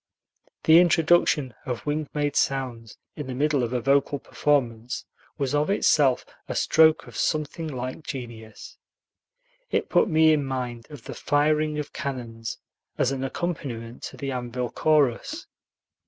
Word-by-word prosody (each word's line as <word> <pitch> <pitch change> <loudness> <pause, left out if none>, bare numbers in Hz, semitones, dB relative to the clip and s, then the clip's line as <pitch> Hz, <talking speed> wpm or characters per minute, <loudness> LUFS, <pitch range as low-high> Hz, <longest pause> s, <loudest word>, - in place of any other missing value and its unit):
The 160 +1 +8
introduction 165 -5 +3
of 125 -4 -5
wing 150 0 -2
made 145 -1 0
sounds 125 -5 -1 0.2
in 150 -3 -6
the 130 - -4
middle 145 0 +1
of 120 -1 -1
a 125 - 0
vocal 140 +3 +2
performance 125 -5 -1 0.3
was 140 -2 -1
of 150 +3 +1
itself 145 -9 +3 0.2
a - - -4
stroke 160 -1 +4
of 120 -4 -13
something 155 +6 -1
like 130 -1 -5
genius. 120 -7 -8 0.9
It - - -1
put - - +3
me 160 -1 +5
in 150 -2 +1
mind 125 -3 -4
of 145 -6 -11
the - - -7
firing 150 +1 +1
of 150 - -5
cannons 115 -5 -5 0.4
as 130 - +2
an 135 -1 -3
accompaniment 130 -6 -4
to - - -8
the 140 -1 -4
Anvil 125 -1 -3
Chorus. 155 - +1
135 Hz, 145 wpm, -25 LUFS, 125-155 Hz, 0.9 s, The